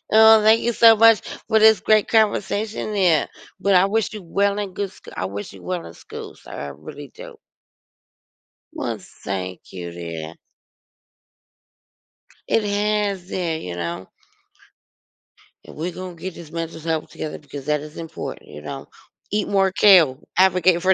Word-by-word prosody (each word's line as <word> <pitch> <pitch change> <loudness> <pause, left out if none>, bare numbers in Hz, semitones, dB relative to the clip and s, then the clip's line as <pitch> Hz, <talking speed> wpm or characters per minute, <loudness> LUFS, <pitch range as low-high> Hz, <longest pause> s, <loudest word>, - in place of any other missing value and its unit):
Oh, 220 -1 +8
thank 220 +1 +5
you 235 0 0
so 225 0 +7
much 225 -2 +6 0.3
for 220 - +3
this 220 0 +6
great 215 -2 +3
conversation 215 0 0
here, 175 -6 +3 0.3
but 200 -1 +2
I 180 +1 +6
wish 220 +2 0
you 210 - -7
well 200 +4 0
and 195 -2 -5
good 200 -2 -3
sc - - -20
I 95 - -2
wish 100 +2 -6
you - - -14
well 180 -2 -3
in - - -11
school, - - -10
sir. - - -15
I 70 +1 -6
really 75 - -10
do. - - -10 1.4
Well, - - -3
thank 95 -2 -7
you, 85 -2 -7
dear. 85 -1 -7 2.1
It 225 - +2
has 205 -2 -1
there, 170 -4 -2
you 90 - -6
know? 85 +2 -5 1.6
And - - -13
we're 170 +4 -3
gonna 185 -1 -8
get 185 +2 -7
this 160 -3 -11
mental 165 -1 -5
health 160 -1 -2
together 155 - -6
because 145 -2 -9
that 150 0 +1
is 150 0 -11
important, 165 - -7
you 75 0 -10
know? 75 - -7 0.4
Eat 210 -1 0
more 195 -1 +2
kale, 175 -10 +6 0.2
advocate 185 -2 +4
for 190 +1 +4
180 Hz, 160 wpm, -22 LUFS, 145-205 Hz, 2.1 s, Oh